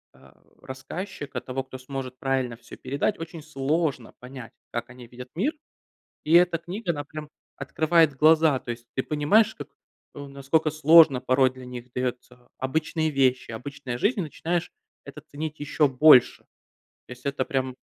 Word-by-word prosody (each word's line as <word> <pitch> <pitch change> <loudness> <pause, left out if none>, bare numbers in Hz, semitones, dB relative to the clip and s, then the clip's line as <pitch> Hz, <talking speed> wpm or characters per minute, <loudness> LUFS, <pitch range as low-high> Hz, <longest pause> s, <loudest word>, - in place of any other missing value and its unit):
а, 65 +1 -20 0.2
рассказчика, 140 +4 -7
того, 130 +1 -4
кто 130 0 -10
сможет 130 -1 -7
правильно 130 -3 -1
всё 120 0 -13
передать, 140 +10 -2
очень 165 0 -8
сложно 150 -2 -2
понять, 125 -2 -10 0.2
как 120 +1 -4
они 120 0 -12
видят 125 +1 -11
мир. 245 - 0 0.7
И 155 - 0
эта 175 0 +5
книга- 175 +4 -4
она 145 -3 -5
прям 150 0 -9 0.3
открывает 155 +2 +2
глаза. 155 -1 +4
То 120 - -6
есть 120 0 -9
ты 130 - 0
понимаешь 205 +10 +2
как 145 - -8 0.5
насколько 140 +2 -1
сложно 155 -3 +6
порой 130 0 +3
для 130 0 -12
них 125 0 -9
дается 125 -1 -5
обычные 155 +4 -1
вещи, 130 -3 +1
обычная 125 +2 -6
жизнь, 210 - +1
и - - 0
начинаешь 165 +2 -3 0.3
это - - -11
ценить 155 +1 -7
еще 150 0 +1
больше. 130 -1 +5 0.6
То - - -14
есть 125 +2 -19
это 140 -2 -1
прям 130 -1 -2
140 Hz, 160 wpm, -25 LUFS, 130-160 Hz, 0.7 s, сложно